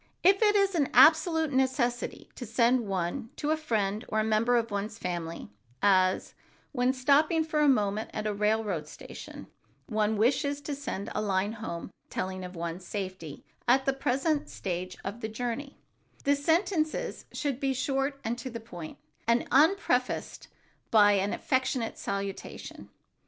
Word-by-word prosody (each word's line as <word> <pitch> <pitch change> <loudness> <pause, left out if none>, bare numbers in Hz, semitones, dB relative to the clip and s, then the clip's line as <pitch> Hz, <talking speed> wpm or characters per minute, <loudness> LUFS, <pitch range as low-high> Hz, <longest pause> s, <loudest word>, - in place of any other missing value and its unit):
If 390 +3 +5
it 420 -1 +5
is 395 -1 +3
an 300 -6 +1
absolute 320 -1 +6
necessity 260 -2 0
to - - -8
send 235 0 +2
one 195 +6 -2
to 300 0 -1
a - - +4
friend 215 -9 -1
or 215 - 0
a - - +2
member 220 +3 +2
of 230 -1 -1
one's 205 +2 -3
family, 170 - -5 0.3
as, 185 +2 +3 0.4
when 250 -2 +2
stopping 290 +5 +3
for 310 -1 -1
a 300 -1 +5
moment 210 -4 +1
at 215 - -4
a 210 - 0
railroad 210 -6 0
station - - -10 0.4
one 215 -1 0
wishes 280 +6 +2
to 290 - -4
send 265 -8 -5
a - - -1
line 200 0 0
home 210 -6 -6 0.2
telling 185 0 -3
of 180 0 -8
one's 170 +2 -4
safety 185 -6 -6 0.2
at 265 +2 +4
the 270 - +2
present 275 +3 0
stage 185 -1 -4
of 200 +5 -5
the 220 - -3
journey, 245 +5 -4 0.5
the 285 +1 +3
sentences 320 +2 0
should 280 -4 -2
be 275 -1 0
short 270 +1 -1
and 235 +2 -2
to 255 - -5
the 230 -1 -6
point, 175 -8 -9 0.3
and 235 +1 +2
unprefaced 290 -5 +2 0.4
by 210 -2 +6
an 200 0 +1
affectionate 260 -3 -1
salutation. 200 0 -5
235 Hz, 155 wpm, -29 LUFS, 200-280 Hz, 0.5 s, absolute